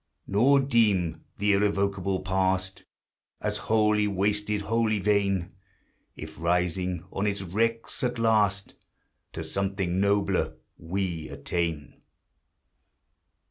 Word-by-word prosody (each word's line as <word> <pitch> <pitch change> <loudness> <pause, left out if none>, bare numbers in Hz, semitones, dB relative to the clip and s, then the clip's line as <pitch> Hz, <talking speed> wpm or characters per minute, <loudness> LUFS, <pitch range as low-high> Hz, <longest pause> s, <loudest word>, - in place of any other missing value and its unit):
Nor 130 +8 +4
deem 100 - +1
the 100 0 +2
irrevocable 100 -2 0
Past 95 0 -1 0.5
As - - -2
whollv 105 -1 +2
wasted, 105 +1 0
whollv 110 -1 +1
vain, 100 -3 +1 0.6
If, 80 0 -9
rising 90 +1 0
on 100 +2 -1
its 100 -1 -2
wrecks, 115 +8 -1
at 125 -1 0
last 105 -3 +2 0.6
To 80 - -5
something 95 +1 -1
nobler 100 -5 +1 0.2
we 85 -2 -3
attain. 80 +1 -3
100 Hz, 100 wpm, -27 LUFS, 90-105 Hz, 0.6 s, Nor